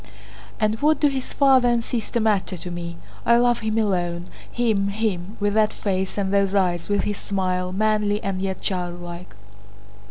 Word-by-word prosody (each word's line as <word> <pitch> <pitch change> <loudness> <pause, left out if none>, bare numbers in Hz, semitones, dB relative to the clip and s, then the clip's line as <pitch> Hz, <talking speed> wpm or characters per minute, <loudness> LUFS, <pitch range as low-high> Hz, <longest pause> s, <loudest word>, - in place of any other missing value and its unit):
"And 215 0 0
what 310 +1 +3
do 295 - +4
his 265 -2 -4
father 265 -3 +4
and 235 -1 +1
sister 235 -1 -2
matter 205 -4 +1
to 175 +1 -7
me? 170 -1 -5 0.3
I 235 - +5
love 240 0 +3
him 220 -1 -1
alone, 175 -5 -1 0.2
him, 220 -5 +1
him, 200 -2 -2
with 205 0 +1
that 215 0 +3
face 190 -1 -2
and 195 -1 -1
those 200 0 +2
eyes, 175 -3 +1
with 205 -1 +1
his 205 -1 -2
smile, 185 -2 -1
manly 210 +1 +1
and 195 -1 -2
yet 190 -1 -3
childlike.... 175 - -4
200 Hz, 170 wpm, -23 LUFS, 185-220 Hz, 0.3 s, I